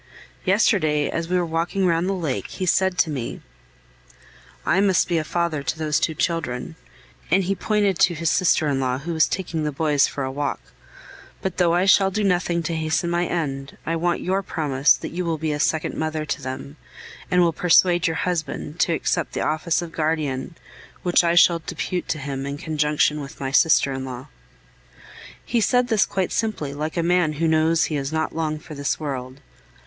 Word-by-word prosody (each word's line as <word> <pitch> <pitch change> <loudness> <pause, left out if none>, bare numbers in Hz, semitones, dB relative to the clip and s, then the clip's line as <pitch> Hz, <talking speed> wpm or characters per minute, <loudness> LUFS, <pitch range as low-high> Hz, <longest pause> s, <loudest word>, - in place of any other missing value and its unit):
Yesterday, 185 -7 +2
as 165 0 -3
we 180 - +2
were 175 - +1
walking 170 +4 -1
round 170 +1 +1
the - - +1
lake, 160 -8 -3
he 185 - -4
said 190 +1 +2
to 160 - +2
me: 130 -5 -4 1.3
"I 195 - +3
must 195 -2 +3
be 170 -2 +1
a - - -2
father 170 -2 -1
to 140 - -3
those 155 -2 0
two 160 - -1
children," 160 -4 -2 0.5
and 190 +4 +3
he 190 +2 0
pointed 205 -2 0
to 175 - +4
his 165 0 0
sister 170 -4 +2
in 140 -2 0
law, 130 -1 0
who 165 +5 -5
was 160 -1 +3
taking 170 -4 -3
the 150 - -1
boys 145 -1 +2
for 140 - -4
a 130 - -3
walk. 145 0 -2 0.8
"But 190 -2 -3
though 175 -2 +3
I 180 +2 +2
shall 195 0 +5
do 210 +2 -2
nothing 175 -3 +1
to 165 +1 -2
hasten 160 +2 -1
my 175 0 +1
end, 135 -5 -3
I 165 - -1
want 175 +1 0
your 190 +2 0
promise 145 -7 +2
that - - -6
you 180 +2 -3
will 165 -2 -1
be 155 0 -2
a 150 - -2
second 155 +1 0
mother 155 -1 -2
to - - -3
them, 130 - -7 0.5
and 180 - +3
will 170 -1 +2
persuade 175 +1 +4
your 165 - -1
husband 170 -2 -3
to 170 - +2
accept 165 0 -1
the - - -2
office 160 +3 0
of 170 - -8
guardian, 155 -2 -2 0.5
which 175 0 +3
I 170 0 +2
shall 170 0 +6
depute 180 +2 -3
to 155 - -1
him 135 -1 -4
in 140 0 -4
conjunction 150 -1 0
with 140 +2 -10
my 135 -1 -3
sister 140 -2 +4
in 130 0 -4
law." 130 -1 -8 1.2
He 235 -1 +1
said 245 +2 +2
this 220 -3 +3
quite 190 -2 -2
simply, 205 -11 -2
like 155 +4 -4
a 170 - +1
man 175 -2 +2
who 165 +3 0
knows 160 +1 +3
he 155 - -1
is 140 +1 -3
not 160 0 -2
long 155 -1 -1
for 155 0 -11
this 140 -2 -2
world. 135 -3 -5
160 Hz, 205 wpm, -23 LUFS, 150-175 Hz, 1.3 s, shall